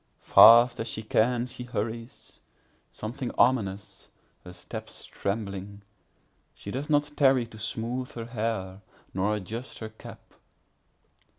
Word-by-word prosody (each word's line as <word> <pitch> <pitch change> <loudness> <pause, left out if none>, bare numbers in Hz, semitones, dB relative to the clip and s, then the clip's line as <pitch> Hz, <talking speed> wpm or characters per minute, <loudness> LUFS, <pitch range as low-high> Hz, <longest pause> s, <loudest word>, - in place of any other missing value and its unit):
Fast 120 +1 +8
as 115 - -3
she 110 -1 -4
can 120 +3 +1
she 125 0 -9
hurries—something 115 +1 -7
ominous—her 100 -5 -2
steps 90 - -7
trembling; 100 -1 -5 0.7
She 100 - -8
does 135 +6 -4
not 145 -1 +2
tarry 135 -4 +4
to 110 -1 -13
smoothe 120 +3 -3
her 115 -1 -6
hair, 110 -5 -3 0.3
nor 100 +3 0
adjust 110 +5 -6
her 110 - -7
cap. 110 - -14
115 Hz, 110 wpm, -27 LUFS, 105-125 Hz, 0.7 s, Fast